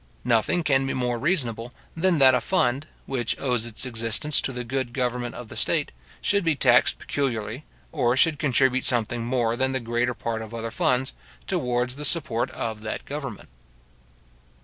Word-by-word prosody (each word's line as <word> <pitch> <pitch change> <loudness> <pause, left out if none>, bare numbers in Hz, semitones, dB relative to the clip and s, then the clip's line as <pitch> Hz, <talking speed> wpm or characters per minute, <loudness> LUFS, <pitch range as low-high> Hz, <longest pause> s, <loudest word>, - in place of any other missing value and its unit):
Nothing 120 +9 +2
can 135 -3 +2
be - - -2
more 125 -2 -1
reasonable, 125 -6 0 0.2
than 175 +1 +2
that 135 -2 +7
a 125 - +2
fund, 140 -5 +1 0.2
which 120 -4 -2
owes 120 -4 0
its 115 +2 -3
existence 115 +5 0
to - - -2
the 125 -1 -4
good 125 0 -3
government 125 -2 -2
of 125 - -8
the - - -10
state, - - +1 0.3
should 200 -1 +2
be 165 -2 +2
taxed 125 -3 +4
peculiarly, 125 -1 -3 0.3
or 130 -5 +1
should 155 0 +3
contribute 130 -2 +2
something 120 -1 0
more 120 -1 0
than 130 +2 0
the 130 - 0
greater 120 +1 -1
part 115 -1 -3
of 110 +1 -8
other 115 0 -4
funds, 125 +3 +1 0.3
towards 125 +1 -1
the 150 - -6
support 135 -6 +1
of 110 -4 -4
that 110 0 -5
government. 135 - -6
125 Hz, 170 wpm, -25 LUFS, 120-135 Hz, 0.3 s, that